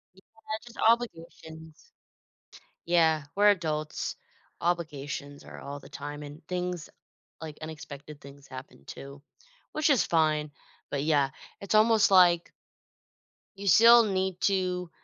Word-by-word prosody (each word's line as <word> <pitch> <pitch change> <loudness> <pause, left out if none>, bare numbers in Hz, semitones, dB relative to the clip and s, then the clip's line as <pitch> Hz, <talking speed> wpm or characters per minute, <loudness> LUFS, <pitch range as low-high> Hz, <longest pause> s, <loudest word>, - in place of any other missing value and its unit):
Y 190 - -19
yeah, 220 +1 -8
just 240 - -14
obligations. 165 - -2 1.0
Yeah, 160 -3 +3
we're 205 0 +6
adults. 155 -5 -2 0.4
Obligations 145 -4 -3
are - - -11
all 140 +1 -7
the - - -14
time, 145 +1 -7
and 145 +2 -11
things 180 -2 -3 0.5
like, 155 -2 -8
unexpected 150 -1 -9
things 140 0 -14
happen, 130 - -11
too. 140 - -10 0.5
Which 310 0 +1
is 255 -10 +4
fine. 155 -2 +1 0.4
But, 140 0 -1
yeah. 145 -3 +2 0.3
It's 200 +2 -2
almost 215 -1 +5
like 175 -2 +5 1.1
you 200 0 -3
still 230 +5 +8
need 190 -3 -2
to 180 -3 0
165 Hz, 125 wpm, -28 LUFS, 150-190 Hz, 1.1 s, still